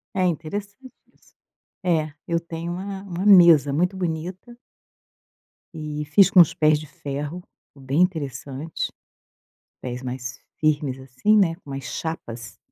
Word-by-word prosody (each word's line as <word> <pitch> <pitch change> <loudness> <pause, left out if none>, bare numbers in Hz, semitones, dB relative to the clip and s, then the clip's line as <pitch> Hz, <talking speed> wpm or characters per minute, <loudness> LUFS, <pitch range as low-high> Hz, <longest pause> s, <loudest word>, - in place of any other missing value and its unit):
É 185 - +2
interessante 205 - -5 0.2
isso. - - -28 0.5
É, 155 -4 +1
eu 170 -1 +1
tenho 170 0 -6
uma 195 +1 -6
uma 185 -1 -4
mesa 170 -8 +7
muito 180 +5 +1
bonita. 180 +7 -4 1.2
E 150 -1 -4
fiz 185 +6 +5
com 185 - +6
os 165 - +4
pés 155 -1 +3
de 155 - -10
ferro, 145 +4 -5 0.3
ficou 135 -2 -18
bem 140 +6 +1
interessante, 145 -3 -2 0.9
pés 125 0 -5
mais 125 0 -6 0.2
firmes 145 -4 +1
assim, 135 +12 +1
né, 175 -5 +4
com 145 -6 -14
umas 135 -1 -5
chapas. 120 -7 -6
160 Hz, 135 wpm, -23 LUFS, 140-180 Hz, 1.2 s, mesa